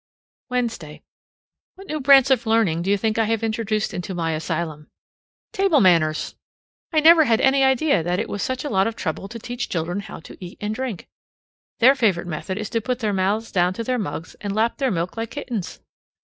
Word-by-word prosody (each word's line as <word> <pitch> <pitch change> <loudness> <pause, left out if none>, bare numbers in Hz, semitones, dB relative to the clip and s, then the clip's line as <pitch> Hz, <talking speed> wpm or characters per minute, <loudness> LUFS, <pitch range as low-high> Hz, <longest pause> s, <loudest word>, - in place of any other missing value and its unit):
Wednesday. 225 -12 -3 0.7
What 390 +1 -13
new 310 -4 -4
branch 270 -1 +6
of 245 -3 +2
learning 220 -8 +2
do 185 - -3
you 205 - +3
think 220 +2 -1
I 225 - +3
have 225 0 -1
introduced 220 -1 -1
into 180 +1 -5
my 165 -2 -1
asylum? 155 -1 -4 0.6
Table 390 -7 +3
manners! 165 -6 +2 0.6
I 310 -2 +3
never 320 0 +7
had 225 -3 +2
any 270 +1 +3
idea 265 - +3
that 175 +2 -1
it - - -2
was 205 - -4
such 260 0 -2
a - - -2
lot 195 0 +2
of 225 - -4
trouble 180 0 -4
to 230 +3 -8
teach 245 +2 -5
children 175 +3 -2
how 200 - -8
to 185 - -12
eat 175 - -9
and 210 +1 -3
drink. 250 -5 -5 0.7
Their 255 +3 +6
favorite 205 -10 +1
method 175 +3 -5
is 215 -1 -5
to 230 - 0
put 250 +2 -2
their 215 -4 -1
mouths 200 +4 -1
down 180 0 +2
to 230 - -4
their 250 +1 -1
mugs 160 -4 -5
and 205 -1 -3
lap 225 +2 +1
their 270 -2 +1
milk 175 +1 -3
like 225 0 -3
kittens. 235 -10 -5
220 Hz, 205 wpm, -22 LUFS, 180-250 Hz, 0.7 s, never